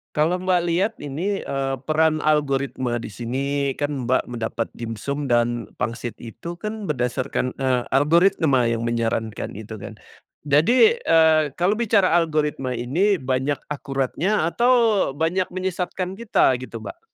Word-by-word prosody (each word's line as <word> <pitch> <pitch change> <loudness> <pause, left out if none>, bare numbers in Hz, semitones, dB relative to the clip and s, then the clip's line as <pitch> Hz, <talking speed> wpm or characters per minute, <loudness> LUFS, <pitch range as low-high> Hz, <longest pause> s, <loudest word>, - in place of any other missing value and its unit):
Kalau 165 +4 +1
Mbak 185 -1 +2
lihat 185 +6 +1
ini, 165 +8 -3
eee, 135 -1 -2
peran 155 0 +2
algoritma 140 -4 0
di 115 -2 -7
sini, 135 +5 -2
kan 145 -4 -3
Mbak 130 - +2
mendapat 115 -1 -3
dimsum 120 +5 -4
dan 120 -1 +1
pangsit 115 +1 -4
itu 120 +9 -8
kan 215 0 -5
berdasarkan, 125 -1 -1
eee, 130 -2 0
algoritma 155 -2 +3
yang 115 0 0
menyarankan 115 -2 -2
gitu 110 +1 -8
kan, - - -8 0.6
jadi, 245 - +5
eee, 160 -1 +5
kalau 185 +6 +1
bicara 215 -5 +3
algoritma 150 -5 0
ini, 165 - +1
banyak 130 +2 -1
akuratnya 150 +6 -1
atau 240 +7 +3 0.4
banyak 165 +5 0
menyesatkan 185 0 -3
kita 210 - +2
gitu, 120 -2 -8
Mbak? 105 - -8
145 Hz, 135 wpm, -23 LUFS, 125-175 Hz, 0.6 s, jadi